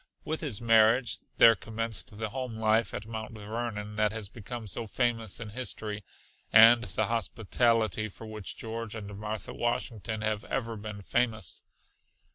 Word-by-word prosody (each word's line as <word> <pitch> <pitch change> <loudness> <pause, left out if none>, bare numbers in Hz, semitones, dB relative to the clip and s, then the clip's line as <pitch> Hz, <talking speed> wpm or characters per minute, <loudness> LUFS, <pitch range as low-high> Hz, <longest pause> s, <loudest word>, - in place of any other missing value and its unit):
With 160 +1 -2
his 135 -10 0
marriage 115 +1 +4 0.2
there 115 - +9
commenced 110 -1 -3
the 110 0 -2
home 125 -2 -4
life 110 +1 +2
at 105 - -5
Mount 110 0 -6
Vernon 105 -1 -4
that 105 -1 +3
has 110 -2 -4
become 115 +2 -7
so 110 +3 -2
famous 115 -2 0
in 115 -2 -6
history, 105 -3 -3 0.5
and 115 +2 +8
the 105 +3 0
hospitality 110 -1 +1
for 110 - -11
which 110 -2 -6
George 115 -1 -5
and 105 -2 -7
Martha 105 +1 -5
Washington 115 -2 -2
have 110 0 0
ever 115 -3 -2
been 105 -1 -7
famous. 110 -9 0
110 Hz, 150 wpm, -29 LUFS, 105-115 Hz, 0.5 s, there